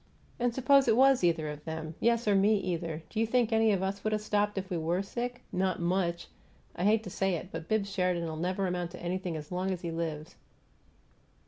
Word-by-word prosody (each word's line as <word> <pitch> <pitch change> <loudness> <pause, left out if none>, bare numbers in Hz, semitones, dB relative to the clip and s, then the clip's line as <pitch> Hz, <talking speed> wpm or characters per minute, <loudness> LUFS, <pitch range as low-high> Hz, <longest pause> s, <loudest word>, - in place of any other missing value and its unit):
And 245 0 +2
suppose 270 +2 +4
it 220 - +4
was 265 -3 +5
either 165 -3 +2
of 150 0 -7
them 160 0 -5
yes, 235 -1 +2
or 205 - +4
me, 200 +2 +4
either 165 -4 -3
do 220 - -2
you 225 - +2
think 235 -1 +2
any 225 0 +4
of 190 -2 +1
us 195 +1 -3
would 215 - 0
have 215 - 0
stopped 210 -1 0
if 190 0 -2
we - - 0
WERE 170 +4 0
sick? 245 +4 -5
Not 185 -1 0
much! 170 0 0 0.5
I 175 - -2
hate 215 +1 +3
to 185 - -7
say 195 0 0
it, 175 +2 -6
but 165 0 -6
Bibbs 205 -2 0
Sheridan'll 175 -4 -1
never 185 +4 -1
amount 180 -1 -2
to - - -8
anything 175 -1 -3
as 150 +1 -9
long 185 +1 -1
as 185 -2 -2
he 170 - -4
lives." 165 0 -4
185 Hz, 225 wpm, -30 LUFS, 170-215 Hz, 0.5 s, was